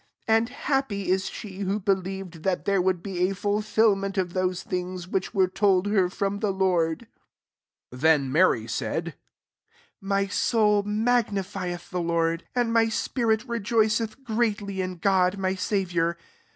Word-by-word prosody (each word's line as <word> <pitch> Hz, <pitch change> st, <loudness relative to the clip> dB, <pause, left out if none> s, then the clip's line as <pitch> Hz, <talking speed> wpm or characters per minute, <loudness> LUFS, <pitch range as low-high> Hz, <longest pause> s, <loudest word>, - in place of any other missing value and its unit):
45 220 Hz, -, +4 dB
And 230 Hz, +1 st, -3 dB
happy 270 Hz, -8 st, -2 dB
is 190 Hz, 0 st, +1 dB
she 195 Hz, -3 st, -8 dB
who 200 Hz, +1 st, -1 dB
beUeved 190 Hz, -3 st, -2 dB
that 185 Hz, +2 st, -1 dB
there 200 Hz, -2 st, +2 dB
would 180 Hz, -1 st, 0 dB
be 180 Hz, -2 st, 0 dB
a -, -, -2 dB
Jktlfilment 205 Hz, -1 st, +1 dB
of 180 Hz, -2 st, -1 dB
those 185 Hz, -1 st, -1 dB
thirds 180 Hz, -1 st, -4 dB
which 190 Hz, +3 st, -2 dB
were 190 Hz, -1 st, +4 dB
told 190 Hz, 0 st, +2 dB
her 200 Hz, -3 st, +2 dB
from 200 Hz, +2 st, -2 dB
the 210 Hz, -, 0 dB
Lord, 185 Hz, -1 st, +1 dB, 0.9 s
45 125 Hz, +1 st, -10 dB
Then 150 Hz, -4 st, +3 dB
Mary 150 Hz, -8 st, +3 dB
saidy 135 Hz, +8 st, -3 dB, 0.9 s
*^My 195 Hz, 0 st, 0 dB
soul 210 Hz, -3 st, +3 dB
magnffieth 200 Hz, -5 st, -1 dB
the 180 Hz, -1 st, -1 dB
Lord; 165 Hz, 0 st, 0 dB
47 -, -, +1 dB
and 230 Hz, -1 st, +1 dB
my 225 Hz, -1 st, +4 dB
spirit 225 Hz, 0 st, 0 dB
rtyoiceth 225 Hz, +1 st, 0 dB
greatly 215 Hz, -5 st, -1 dB
in 185 Hz, -1 st, -4 dB
Oody 185 Hz, +1 st, +2 dB
my 190 Hz, -1 st, 0 dB
Saviour. 175 Hz, -4 st, -1 dB
195 Hz, 150 wpm, -26 LUFS, 180-210 Hz, 0.9 s, 45